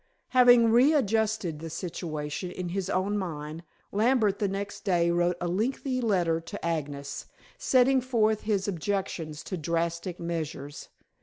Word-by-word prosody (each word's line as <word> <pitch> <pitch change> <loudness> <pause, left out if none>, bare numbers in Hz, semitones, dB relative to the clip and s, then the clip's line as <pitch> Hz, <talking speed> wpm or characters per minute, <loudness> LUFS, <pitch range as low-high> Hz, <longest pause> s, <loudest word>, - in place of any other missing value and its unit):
Having 245 -3 +6
readjusted 220 - +2
the 165 +1 -6
situation 155 -2 -4
in 180 0 -5
his 190 +1 -3
own 200 +3 0
mind, 155 -3 -5 0.3
Lambert 215 -2 +2
next 200 0 -3
day 170 -3 +2
wrote 175 0 +1
a 175 - -2
lengthy 255 +7 -1
letter 175 -7 +1
to 165 0 -7
Agnes, 145 -4 -3 0.3
setting 260 0 +4
forth 220 -4 +1
his 205 -3 0
objections 175 -4 -3
to 185 - -4
drastic 170 +2 -2
measures. 155 -4 -5
185 Hz, 130 wpm, -28 LUFS, 165-220 Hz, 0.3 s, Having